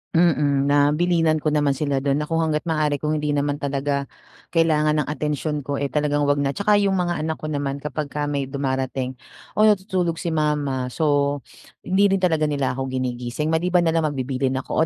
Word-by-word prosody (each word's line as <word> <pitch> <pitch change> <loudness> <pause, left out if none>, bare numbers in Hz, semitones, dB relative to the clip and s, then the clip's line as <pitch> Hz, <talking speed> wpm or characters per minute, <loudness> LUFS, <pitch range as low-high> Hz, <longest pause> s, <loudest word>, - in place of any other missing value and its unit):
Mm, 145 -4 +3
na 145 +1 +4
bilinan 165 -2 +2
ko 155 - +1
naman 145 -2 +2
sila 140 0 -1
do'n 140 +2 0
na 150 - -5
kung 165 - 0
hangga't 160 0 0
maaari 150 -2 0
kung 155 0 0
hindi 150 -1 -1
naman 145 0 0
talaga 140 0 -1 0.5
kailangan 155 -2 +3
ng 145 - -5
atensyon 150 0 -2
ko, 145 - -3
eh, 140 - -1
talagang 145 0 0
'wag 145 - +3
na. 140 -1 0
Tsaka 205 +3 +3
yung 200 -1 +2
mga 175 -2 0
anak 160 - 0
ko 155 - -4
naman 140 -1 -3
kapagka 150 0 -3
may 140 -2 -1
dumarating, 130 -1 -3 0.4
"Oh, 215 - +5
natutulog 190 -5 +1
si 170 - -2
mama," 150 -4 0
so 145 -3 +1 0.4
hindi 195 +1 +2
rin 195 - +1
talaga 160 -4 +2
nila 140 -3 -1
ako 130 -1 -3
ginigising. 125 +3 -2
Maliban 175 +2 +2
nalang 160 -1 +1
magbibilihin 130 0 -1
ako, 135 +4 0
150 Hz, 190 wpm, -22 LUFS, 140-160 Hz, 0.5 s, Oh